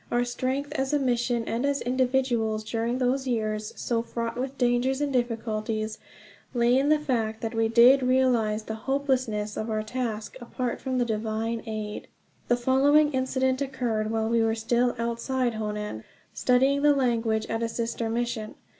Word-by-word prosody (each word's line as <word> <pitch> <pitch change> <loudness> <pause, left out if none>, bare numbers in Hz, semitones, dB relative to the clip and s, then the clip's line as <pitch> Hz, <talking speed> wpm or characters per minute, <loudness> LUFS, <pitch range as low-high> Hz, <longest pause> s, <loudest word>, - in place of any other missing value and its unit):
Our 240 0 +2
strength 260 +3 -2
as 265 +1 -1
a - - +4
mission 240 -2 0
and 230 +3 -2
as 280 0 +1
individuals, 245 -3 0
during 230 +2 -1
those 260 +1 0
years 215 -3 -1
so 230 -2 0
fraught 230 0 -4
with 265 +2 -4
dangers 245 +2 +1
and 290 -2 -1
difficulties, 220 -3 -2 0.6
lay 240 +1 +4
in 275 +2 +2
the 305 - +5
fact 225 -7 -2
that 225 0 -3
we 225 0 +2
did 240 +4 +6
realize 250 -4 +2
the 220 - -5 0.2
hopelessness 255 -7 0
of 220 - -3
our 215 -1 -1
task 225 0 -4
apart 240 0 -4
from 260 -1 -2
divine 220 +1 -2
aid. 215 -1 -5 0.4
The 240 - +3
following 280 +4 +4
incident 260 0 0
occurred 240 -6 -1
while 220 0 0
we 230 0 +2
were 225 0 +2
still 240 +2 +1
outside 235 +2 -1
Honan, 210 - -4 0.3
studying 265 +3 +3
the 295 0 +5
language 230 -4 +1
at 225 0 -3
a 230 - 0
sister 230 0 -2
mission. 230 -2 -2
240 Hz, 165 wpm, -26 LUFS, 225-260 Hz, 0.6 s, did